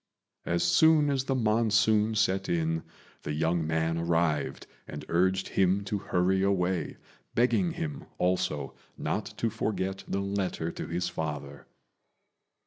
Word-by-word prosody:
As 85 0 +1
soon 150 - +5
as 135 -1 0
the 135 - 0
monsoon 110 -1 +3
set 95 -2 +1
in 80 -1 0 0.4
the 75 - -4
young 80 +1 0
man 80 +1 0
arrived 85 -2 0 0.2
and - - -7
urged 95 +3 +1
him 95 +1 +2
to 100 0 -2
hurry 95 +1 +1
away, 95 -3 0 0.4
begging 160 +9 +2
him, 155 -5 -5
also, 75 -6 0 0.2
not - - -2
to 115 - 0
forget 95 -3 -2
the 100 - -1
letter 100 -4 -2
to - - -6
his 90 +1 -1
father. 75 -4 -5
95 Hz, 135 wpm, -29 LUFS, 85-110 Hz, 0.4 s, soon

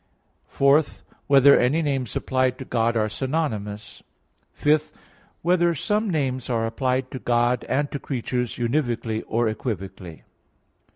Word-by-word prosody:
(4) 140 +3 +4 0.5
Whether 140 0 +7
any 145 +7 +2
names 135 -6 -2
applied 130 -1 0
to 130 - -8
God 115 -1 0
are 110 -1 +1
synonymous? 110 -5 -3 0.5
(5) 150 +1 +1 0.5
Whether 175 0 +2
some 210 +7 0
names 130 -7 -1
are 115 -2 0
applied 130 +3 -1
to 130 - -5
God 120 +1 +1
and 145 +1 -1
to 140 - -4
creatures 125 -3 -3
univocally 120 -3 -1
or 115 +1 +1
equivocally? 95 -7 -5
130 Hz, 125 wpm, -24 LUFS, 115-145 Hz, 0.5 s, Whether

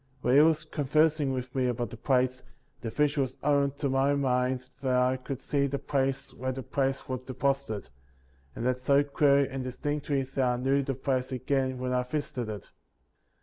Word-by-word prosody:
While 125 - +2
he 140 - +8
was 160 0 +3
conversing 155 0 +2
with 125 -1 -4
me 130 -2 +1
about 120 -2 -2
the - - -7
plates, 130 +1 +1 0.4
the 115 - -3
vision 145 +4 +1
was 130 -2 -3
opened 140 -1 +2
to 140 - +1
my 135 +1 +2
mind 130 -1 0
that 130 -2 +1
I 125 +1 +3
could 130 +1 -6
see 140 -1 +1
the 140 +1 -2
place 135 0 -1
where 130 +1 -3
the 130 0 -5
plates 135 +1 -1
were 130 - -2
deposited, 130 - -2 0.7
and 115 - -4
that 125 0 +1
so 140 +2 +4
clearly 140 -1 +3
and 135 -1 -4
distinctly 140 +2 -2
that 135 0 -2
I 125 -1 +2
knew 135 +3 +2
the 135 -1 -2
place 130 0 -1
again 130 0 0
when 125 0 -2
I 125 - +2
visited 125 -3 -3
it. 105 -3 -7
135 Hz, 190 wpm, -29 LUFS, 125-140 Hz, 0.7 s, he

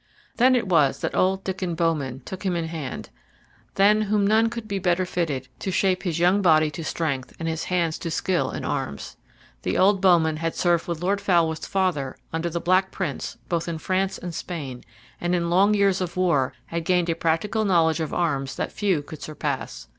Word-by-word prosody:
Then 255 +2 +5
it 235 -5 0
was 155 -7 +3
that - - -2
old 190 +1 +2
Diccon 185 -2 -3
Bowman 150 -6 -1
took 190 - -7
him 185 -3 0
in 170 -1 -1
hand, 160 -5 -6 0.6
than 210 +2 +5
whom 210 -1 +1
none 220 +2 +4
could 235 -2 -6
be 200 -2 -2
better 180 0 +1
fitted 155 -8 -2
to - - -3
shape 185 0 +1
his 170 -4 -2
young 180 +4 +3
body 155 -4 +4
to 155 +3 -6
strength 150 -5 -2
and 165 - -4
his 160 0 -2
hands 170 -3 0
to 170 - -4
skill 175 +2 0
in - - -5
arms. 70 0 -4 0.5
The 90 - -1
old 195 0 +4
bowman 165 -5 +4
had 165 +1 -2
served 175 -2 +1
with 170 -1 -4
Lord 200 +2 +1
Falworth's 165 -4 +1
father 180 -9 -1 0.2
under 165 +1 -1
the 170 +1 -2
Black 185 +2 +2
Prince 170 -9 -4
both 170 -1 -1
in 165 -1 -3
France 190 +3 -1
and 175 -1 -6
Spain, 140 -8 -6 0.4
and 175 +1 +1
in 170 -1 -1
long 200 +4 +4
years 195 -2 +2
of 175 -1 -4
war 155 -9 +2
had 165 +3 -4
gained 175 0 +1
a - - +3
practical 165 +7 0
knowledge 170 -5 +3
of 160 -2 -2
arms 140 -6 -1
that - - -3
few 190 -8 0
could 155 0 -10
surpass. 140 - -4
175 Hz, 200 wpm, -24 LUFS, 160-190 Hz, 0.6 s, Then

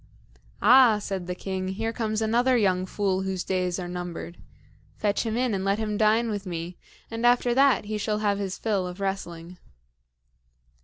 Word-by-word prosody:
"Ah!" 240 0 +7
said 195 -3 -4
the 180 - -3
king, 190 0 -4
"here 225 +4 -3
comes 220 -1 -1
another 245 +3 +3
young 185 -4 +1
fool 190 -1 -1
whose 190 -1 -3
days 180 -2 -1
are 180 -2 -5
numbered. 175 -1 -6 0.6
Fetch 210 +2 0
him 225 +1 -1
in 250 -2 +1
and 190 -1 -1
let 195 +1 +1
him 215 -1 -2
dine 220 +2 +2
with 205 -2 -4
me; 170 0 -5 0.4
and 225 +1 -4
after 245 0 +4
that 270 -3 +4
he 215 0 -3
shall 210 0 -1
have 205 -1 0
his 195 -2 -3
fill 200 -5 -1
of 180 +2 -8
wrestling." 180 -3 -5
200 Hz, 175 wpm, -26 LUFS, 185-225 Hz, 0.6 s, Ah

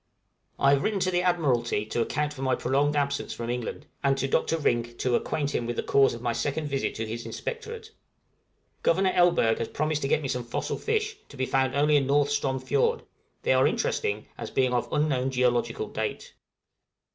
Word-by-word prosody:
I 135 - +4
have 140 -1 +3
written 210 -2 0
to 185 - +1
the 175 0 +2
admiralty 130 - +1
to 110 +2 -1
account 150 +5 -1
for 135 - -9
my 130 -1 +2
prolonged 140 +4 +1
absence 140 -1 -1
from 115 0 -4
England; 125 +4 -4 0.2
and 135 -1 +3
to 135 - 0
Dr. 165 +4 +1
Rink 120 -5 0
to 125 - 0
acquaint 145 +2 -1
him 120 - -1
with 120 - -2
the - - -2
cause 135 -3 +3
of 115 - -10
my 120 -1 0
second 145 +5 -2
visit 135 -1 -1
to 110 - -3
his 115 +2 -5
inspectorate. 455 -1 -6 0.9
Governor 190 +2 +3
Elberg 175 -12 +3
has 115 - -1
promised 155 0 -1
to 135 - 0
get 150 - +1
me - - -1
some 125 -1 -2
fossil 120 - -3
fish, 435 -1 -1
to 140 - -12
be 130 - 0
found 130 0 +1
only 150 +1 +4
in 135 -2 +1
North 145 +1 +3
Strom 135 -2 0
Fiord: 465 - +1 0.4
they - - +3
are - - +4
interesting, 435 -1 -1
as - - -5
being 130 -1 +1
of 120 - -1
unknown 135 -4 +1
geological 120 -3 0
date. 110 0 -4
140 Hz, 205 wpm, -27 LUFS, 125-155 Hz, 0.9 s, I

